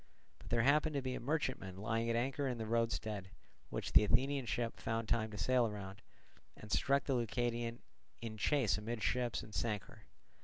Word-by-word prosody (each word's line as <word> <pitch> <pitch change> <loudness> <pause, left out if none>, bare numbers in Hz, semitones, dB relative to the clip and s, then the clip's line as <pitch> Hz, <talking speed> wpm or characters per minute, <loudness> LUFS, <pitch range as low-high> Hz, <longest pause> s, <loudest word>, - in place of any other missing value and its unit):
But - - -12
there 115 -1 +3
happened 150 +3 +4
to 140 - +1
be 130 -1 -2
a - - -3
merchantman 130 - -2
lying 115 +3 -1
at 115 - +2
anchor 135 +4 0
in 125 -2 -2
the 110 - -3
roadstead, 110 -3 -1 0.4
which - - -3
the - - +8
Athenian 130 +3 +2
ship 115 +3 -1
found 115 0 -2
time 110 -1 +1
to 105 - -8
sail 125 +1 +3
round, 100 0 -7 0.6
and 105 - -10
struck 140 +1 +3
the 135 - 0
Leucadian 120 0 -1 0.4
in 115 -1 -5
chase 115 -1 +2
amidships 120 +2 -1
and 110 - -12
sank 105 -4 -1
her. - - -16
115 Hz, 185 wpm, -36 LUFS, 110-130 Hz, 0.6 s, the